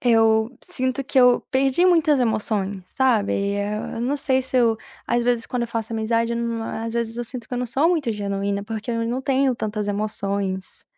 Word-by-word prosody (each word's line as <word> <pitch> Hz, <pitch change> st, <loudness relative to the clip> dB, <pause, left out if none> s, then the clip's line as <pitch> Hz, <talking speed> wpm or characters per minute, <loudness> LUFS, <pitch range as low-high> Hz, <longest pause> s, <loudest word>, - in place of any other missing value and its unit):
eu 225 Hz, 0 st, +3 dB
sinto 260 Hz, +1 st, -2 dB
que 270 Hz, 0 st, 0 dB
eu 250 Hz, -1 st, +6 dB
perdi 270 Hz, +6 st, +2 dB
muitas 320 Hz, -6 st, +4 dB
emoções, 210 Hz, -4 st, -1 dB
sabe. 245 Hz, -7 st, +3 dB, 0.2 s
Eu 210 Hz, +2 st, -3 dB
não 260 Hz, +5 st, 0 dB
sei 265 Hz, -2 st, +1 dB
se 260 Hz, 0 st, -3 dB
eu, 230 Hz, -2 st, +4 dB, 0.3 s
às 240 Hz, 0 st, +1 dB
vezes 240 Hz, -1 st, +1 dB
quando 250 Hz, -1 st, -2 dB
eu 235 Hz, -, -3 dB
faço 230 Hz, -1 st, -3 dB
amizade, 230 Hz, +1 st, 0 dB
eu 235 Hz, -, -1 dB
num 230 Hz, -1 st, -2 dB
às 225 Hz, 0 st, -4 dB
vezes 230 Hz, -1 st, -2 dB
eu 240 Hz, -, -3 dB
sinto 235 Hz, -1 st, -8 dB
que -, -, -16 dB
eu 245 Hz, -, -2 dB
não 250 Hz, -, -1 dB
sou 270 Hz, +7 st, +2 dB
muito 310 Hz, -10 st, +1 dB
genuína, 200 Hz, -1 st, -2 dB
porque 220 Hz, +2 st, -4 dB
eu 230 Hz, 0 st, -1 dB
não 250 Hz, +2 st, -1 dB
tenho 265 Hz, -1 st, +1 dB
tantas 210 Hz, -1 st, -3 dB
emoções. 200 Hz, -2 st, -3 dB
230 Hz, 200 wpm, -23 LUFS, 215-255 Hz, 0.3 s, eu